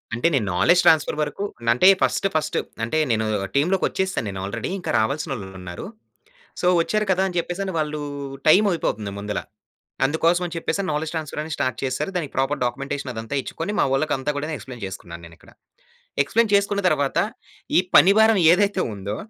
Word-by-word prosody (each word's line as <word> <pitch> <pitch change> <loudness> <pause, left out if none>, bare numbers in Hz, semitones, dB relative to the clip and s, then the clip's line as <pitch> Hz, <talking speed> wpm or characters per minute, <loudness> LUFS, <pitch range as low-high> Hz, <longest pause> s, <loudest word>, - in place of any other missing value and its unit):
అంటే, 120 - +1
నేను 130 -7 +1
knowledge 175 - +4
transfer 160 -2 +4
వరకు 195 +6 -4 0.2
న - - -7
అంటే, 125 +10 +4
ఫస్ట్, - - +1
ఫస్ట్ 155 - 0 0.3
అంటే, 120 +8 -1
నేను 110 -1 +1 0.3
టీమ్‌లోకొచ్చేసాను 190 +1 0
నేను. 95 -1 -6
ఆల్రెడీ 110 +3 -4
ఇంకా - - -3
రావాల్సిన 140 +8 -1
వాళ్ళు 100 -7 -6
ఉన్నారు. 90 -1 -7 0.8
సో, - - 0 0.2
వచ్చారు 215 +4 -1
కదా 185 +1 +1
అని 180 - -7
చెప్పేసి, 175 +3 -2
వాళ్ళు 150 0 -2 0.5
టైమ్ 205 +6 +6
అయిపోతుంది 105 - -2
ముందల. 105 0 -3 0.7
అందుకోసం 165 +5 +2
అని 170 - -6
చెప్పేసి, 195 +4 -1
నౌలెడ్జ్ 150 +2 -2
ట్రాన్స్‌ఫర్ 155 -2 -4
అని 160 - -8
స్టార్ట్ 130 -3 -1
చేసారు. 130 +8 -2
దానికి 160 -6 -3
ప్రాపర్ 135 +1 0
డాక్యుమెంటేషన్ 140 +2 -3
అదంతా 115 +4 -4
ఇచ్చుకొని, 175 +9 -5
మా - - +4
వాళ్ళకి 150 +3 +1
అంతా 140 +3 -2
కూడా 155 +2 -3
ఎక్స్‌ప్లైన్ 125 -4 -10
చేసుకున్నాను 85 -3 -9
నేను 85 0 -17
ఇక్కడ. - - -19 0.7
ఎక్స్‌ప్లైన్ 225 +7 +1
చేసుకున్న 200 0 +2
తరువాత, 145 -4 0 0.6
ఈ - - +7 0.2
పని 185 +7 +7
భారం 220 -2 +5
ఏదైతే 200 +1 +2
ఉందో 100 +1 -5
150 Hz, 175 wpm, -23 LUFS, 120-180 Hz, 0.8 s, ఈ